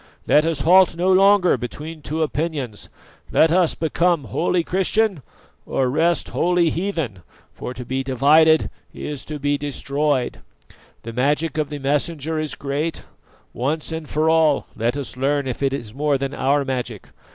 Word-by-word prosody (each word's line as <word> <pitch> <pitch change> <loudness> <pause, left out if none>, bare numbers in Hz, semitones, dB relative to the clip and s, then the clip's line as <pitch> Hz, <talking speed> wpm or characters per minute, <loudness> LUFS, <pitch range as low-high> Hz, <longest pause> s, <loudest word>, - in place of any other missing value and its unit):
Let 150 +1 +4
us 160 -4 -1
halt 180 +3 +5
no 185 +2 +3
longer 195 -1 +5
between 150 +6 -7
two 155 +2 -2
opinions, 145 -8 -3 0.4
let 160 - +4
us 175 -1 +3
become 170 0 +1
wholly 170 - 0
Christian 190 0 0 0.4
or 130 -2 -1
rest 165 +4 +1
wholly 175 -2 +2
heathen, 165 - -3 0.3
for 125 - -7
to 125 0 -7
be 130 +2 -2
divided 150 +5 +4 0.2
is 145 -3 -5
to 155 - -5
be 145 0 0
destroyed. 140 -2 -1 0.6
The 115 - -7
magic 145 +5 0
of 150 -2 -1
the 150 - -5
Messenger 150 +3 -1
is 155 -1 -3
great; 145 +4 -3 0.5
once 150 +6 -2
and 160 -2 -5
for 155 +1 0
all 160 -3 +3
let 120 +4 -1
us 140 -3 -6
learn 140 +2 0
if 130 0 -4
it 135 -1 +1
is 120 -6 -5
more 145 +1 +1
than 135 +1 -4
our 140 +1 +1
magic. 125 -5 -4
150 Hz, 160 wpm, -21 LUFS, 135-165 Hz, 0.6 s, halt